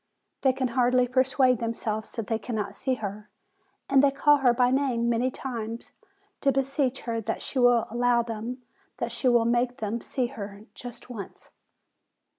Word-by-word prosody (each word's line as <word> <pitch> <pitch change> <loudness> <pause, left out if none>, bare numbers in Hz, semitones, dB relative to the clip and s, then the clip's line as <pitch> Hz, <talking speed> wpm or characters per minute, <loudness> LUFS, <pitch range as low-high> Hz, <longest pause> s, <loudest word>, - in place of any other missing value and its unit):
They 265 - +4
can 260 -1 -1
hardly 250 +1 +3
persuade 255 -1 +3
themselves 225 -2 -3
that 225 - -4
they 225 0 -1
cannot 220 -1 -4
see 260 -1 -1
her, 210 -2 -6 0.6
and 270 -1 +5
they 285 - +5
call 290 +2 +4
her 265 -3 +4
by 245 +1 +3
name 260 -3 +1
many 235 +2 +2
times, 235 -3 -6 0.5
to 275 - +3
beseech 270 0 0
her 230 -1 -2
that 225 +1 -3
she 265 - -3
will 245 -2 +5
allow 240 0 +2
them, 230 +2 -5 0.3
that 235 0 -3
she 255 - 0
will 240 -2 +4
make 245 +1 +1
them 220 +2 -3
see 255 - -2
her 205 -5 -7
just 245 0 -10
once. 210 -5 -9
245 Hz, 170 wpm, -27 LUFS, 230-255 Hz, 0.6 s, and